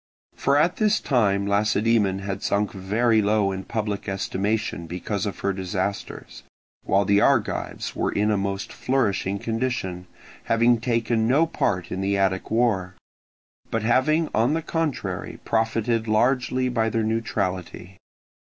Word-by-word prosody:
For 140 +1 +2
at 165 +4 +2
this 215 -1 +2
time 100 -7 +1
Lacedaemon 100 -1 +1
had 100 -1 -4
sunk 105 +1 0
very 110 +4 +1
low 105 -1 +2
in 95 0 -5
public 105 -2 -3
estimation 95 -2 -2
because 95 +4 -3
of 100 - -6
her 100 - 0
disasters, 95 +1 -4 0.4
while 100 +1 +2
the 100 +1 +4
Argives - - 0
were - - 0
in 105 +1 +1
a - - +2
most 100 0 -3
flourishing 100 -7 0
condition, 110 -5 -3 0.4
having 115 0 +3
taken 115 -2 +1
no 145 +7 +4
part 90 - -1
in 95 - -3
the 100 +1 0
Attic 95 -1 0
war, 105 -6 +1 0.7
but 115 -1 -1
having 155 +8 +2
on 120 +8 +2
the 165 - -2
contrary 165 -3 -3
profited 115 0 0
largely 125 +3 +1
by 115 -3 +1
their 110 +1 0
neutrality. 100 -4 -3
110 Hz, 140 wpm, -24 LUFS, 95-120 Hz, 0.7 s, the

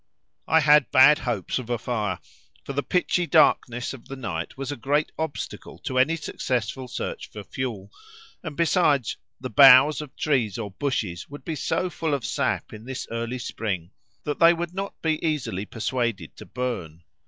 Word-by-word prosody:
I 160 +1 +4
had 150 -1 +5
bad 145 +4 +7
hopes 120 - -2
of 120 -2 -8
a 120 - 0
fire, 105 -7 -2 0.5
for 140 - -6
the 140 - 0
pitchy 180 +1 0
darkness 125 -7 +3
of 130 - -12
the 135 - -6
night 95 -10 -5
was 135 0 -4
a - - -3
great 145 +5 0
obstacle 160 -3 -5
to 130 -1 -2
any 150 +6 +3
successful 130 -5 -3
search 125 - -5
for 105 - -9
fuel, 110 -5 -5 0.5
and 160 -4 -7
besides, 155 - +2 0.2
the 130 -1 -6
boughs 140 +1 +8
of 150 -3 -10
trees 125 -10 0
or 105 -4 -5
bushes 100 -7 -3
would 145 +1 -10
be 165 - -2
so 165 +5 -1
full 160 -4 -1
of 135 - -5
sap - - -1
in 110 +1 -10
this 130 0 -5
early 115 +2 -3
spring, 95 -7 -4 0.3
that 150 -1 -3
they 165 +1 +7
would 170 +1 -4
not 195 +1 -5
be 160 -1 0
easily 130 - -2
persuaded 115 - -2
to - - -11
burn. 90 -11 -4
130 Hz, 175 wpm, -25 LUFS, 115-150 Hz, 0.5 s, boughs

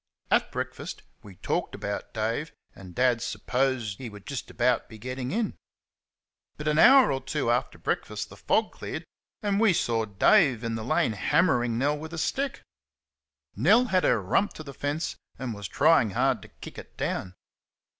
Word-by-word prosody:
At - - +3
breakfast - - -5 0.2
we 100 -3 -13
talked - - -2
about 100 0 -5
Dave, 115 +8 -2 0.2
and 90 -2 -12
Dad 125 -2 +2
"s'posed" 120 0 -1
he 125 - -6
would 105 -2 -13
just 140 -3 -5
about 120 0 +1
be 110 - -11
getting 125 +2 -5
in; 220 - -1 1.0
but 150 - -5
an 150 +1 +2
hour 265 +4 +8
or 135 0 -1
two 120 -2 -1
after 120 - -1
breakfast - - -3
the - - -12
fog - - +1
cleared, - - -6 0.4
and 200 -1 +1
we 220 -4 +5
saw 115 -7 0
Dave 125 - +4
in 115 0 -2
the 110 -1 -3
lane 115 -1 +1
hammering 120 - +2
Nell 145 +4 +1
with 160 +2 -8
a - - -5
stick. 270 - -2 0.9
Nell 245 +3 +5
had 185 - +4
her 120 - +3
rump 100 - +1
to 155 - -9
the 140 -2 -9
fence 145 +4 -3 0.2
and 130 -3 -4
was 100 -2 -6
trying 125 -3 +4
hard 125 +1 +1
to - - -12
kick - - -11
it - - -14
down. 95 -1 -3
125 Hz, 175 wpm, -27 LUFS, 110-155 Hz, 1.0 s, hour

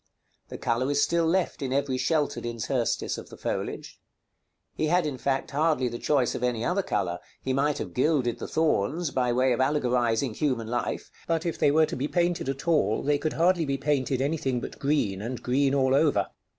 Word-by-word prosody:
The - - -6
color 125 +3 0
is 145 0 +2
still 170 -1 +2
left 180 -1 0
in 135 -2 -2
every 140 -1 0
sheltered 155 -1 0
interstice 120 +1 -1
of - - -11
the - - -11
foliage. - - -4 0.7
He 155 - -1
had, 175 +1 +2
in 140 -4 -3
fact, 135 -1 -1
hardly 150 -3 +1
the 120 - -6
choice 140 -5 +1
of - - -4
any 120 -2 0
other 185 +3 +1
color; 90 - -2 0.2
he 130 - -1
might 145 +2 +1
have - - -5
gilded 130 -3 +1
the - - -5
thorns, 160 - 0
by 125 -2 +1
way 130 +1 +3
of 120 - 0
allegorizing 125 -3 +1
human 125 -4 -1
life, 120 +2 -3 0.2
but 165 0 0
if 170 - -2
they - - +4
were 155 +2 +4
to - - -5
be 135 +3 -2
painted 175 -4 0
at 135 +4 -5
all, 145 -11 +2
they 145 0 +2
could 155 +1 -1
hardly 175 +1 +3
be 140 -2 -1
painted 135 -2 0
any 150 +4 0
tiling 130 -3 -1
but - - -8
green, 135 -10 0
and 120 +3 -5
green 135 +2 +2
all 130 -1 +3
over. 145 +1 +3
140 Hz, 205 wpm, -27 LUFS, 125-155 Hz, 0.7 s, they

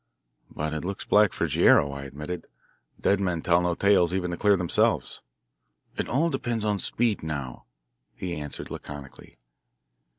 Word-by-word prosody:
"But 75 +1 -4
it 80 - -3
looks 100 +2 -4
black 105 -2 +5
for - - -1
Guerrero," 70 -1 +4
I 70 0 -6
admitted. 75 +6 -6 0.5
"Dead 100 - +2
men 90 -4 -1
tell 85 0 +4
no 90 -1 0
tales 95 -3 +3
even 90 -2 -1
to 85 - -4
clear 100 -1 +4
themselves." 90 -2 +1 0.7
"It - - -3
all 160 +6 +2
depends 120 -5 -2
on 105 -2 +1
speed 115 0 0
now," 70 -5 -5 0.5
he 90 -2 -4
answered 75 -1 -7
laconically. 70 -2 -9
90 Hz, 155 wpm, -26 LUFS, 75-100 Hz, 0.7 s, black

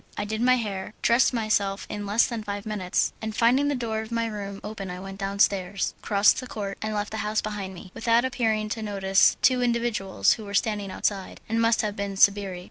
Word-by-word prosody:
I 205 - -2
did 220 +2 -3
my 255 +1 +5
hair, 205 -4 -4
dressed 235 +2 +4
myself 215 -4 0
in 205 -1 -5
less 210 +3 +4
than 230 -3 -4
five 205 0 -5
minutes, 200 -4 -1
and 220 -1 -4
finding 250 +5 +3
the 290 - +1
door 225 -3 -2
of 220 +1 -9
my 230 0 0
room 200 -3 -5
open 205 -2 -6
I 180 0 -6
went 195 +1 -8
downstairs, 195 -1 0
crossed 200 -1 +4
the 255 - -7
court, 200 -4 -5
and 215 0 -2
left 205 0 -2
the 220 - -4
house 215 0 0
behind 200 -3 -5
me, 180 +1 -11
without 230 +1 +2
appearing 225 -4 0
to 220 - -3
notice 195 -2 +3
two 255 -1 +4
individuals 235 - +1
who 220 - -8
were 200 0 -5
standing 205 -1 0
outside, 195 0 -2
and 225 +1 0
must 230 -1 +3
have 210 -1 -2
been 200 -1 -4
sbirri. 200 -2 +3
210 Hz, 215 wpm, -26 LUFS, 200-230 Hz, -, my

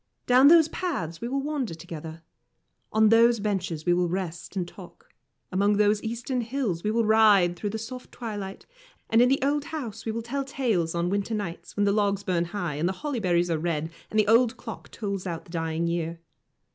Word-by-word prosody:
Down 255 +2 +6
those 325 0 +7
paths 270 - -3
we 235 - -3
will 270 +2 -1
wander 275 - -2
together. 160 -1 -9 0.7
On 220 0 +4
those 230 +1 +5
benches 185 -6 -2
we 175 - +4
will 175 0 +1
rest 180 0 -4
and 180 -2 -1
talk. 180 0 -14 0.4
Among 200 +2 +2
those 210 0 +3
eastern 240 +3 -2
hills 230 -8 -2
we 210 - 0
will 230 +1 +1
ride 210 -5 +5
through 205 +4 -3
the 220 - -3
soft 250 +3 -8
twilight, 205 -5 -6 0.5
and 225 - +6
in 250 - +5
the 270 - +4
old 290 +1 +1
house 235 -9 -6
we 225 - -2
will 230 +1 -4
tell 275 +4 -2
tales 230 - -1
on 170 +1 0
winter 200 +3 -1
nights, 195 -4 -6
when 205 - +3
the 200 - +3
logs 200 -1 +1
burn 175 -3 0
high, 170 -5 -4
and 165 +4 +1
the - - -1
holly 285 -5 -1
berries 175 -3 +1
are 160 - 0
red, 160 -1 -2 0.2
and 215 - +1
the 210 - +3
old 230 +2 +4
clock 225 - -8
tolls 200 -3 -4
out 170 -2 -5
the - - -15
dying 165 -1 -1
year. 170 0 -2
205 Hz, 210 wpm, -26 LUFS, 175-235 Hz, 0.7 s, those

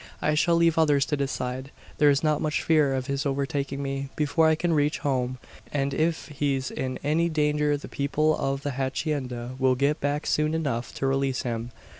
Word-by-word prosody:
I 150 - +1
shall 170 +3 +3
leave 165 -1 +3
others 145 -3 +4
to 150 - -1
decide. 130 -1 -3 0.3
There's 145 -1 +4
not 155 -1 +2
much 155 0 0
fear 150 -4 +3
of 130 -1 -2
his 140 0 -2
overtaking 140 0 -2
me, 135 0 -3
before 155 +2 +2
I 160 - +4
can 170 +1 0
reach 150 0 +2
home; 130 -2 -1 0.3
and 140 -1 -1
if 160 +3 0
he's 140 -2 -1
in 130 -1 -3
any 160 +4 +2
danger 150 -1 +1
the 145 - -9
people 155 +2 +1
of 135 0 -2
the 145 - -1
hacienda 130 -2 -3
will 130 -1 +3
get 140 +4 +1
back 145 +1 -1
soon 155 +1 +1
enough 135 -7 -2
to - - -2
release 135 -1 0
him. 115 -2 -3
140 Hz, 190 wpm, -26 LUFS, 135-150 Hz, 0.3 s, others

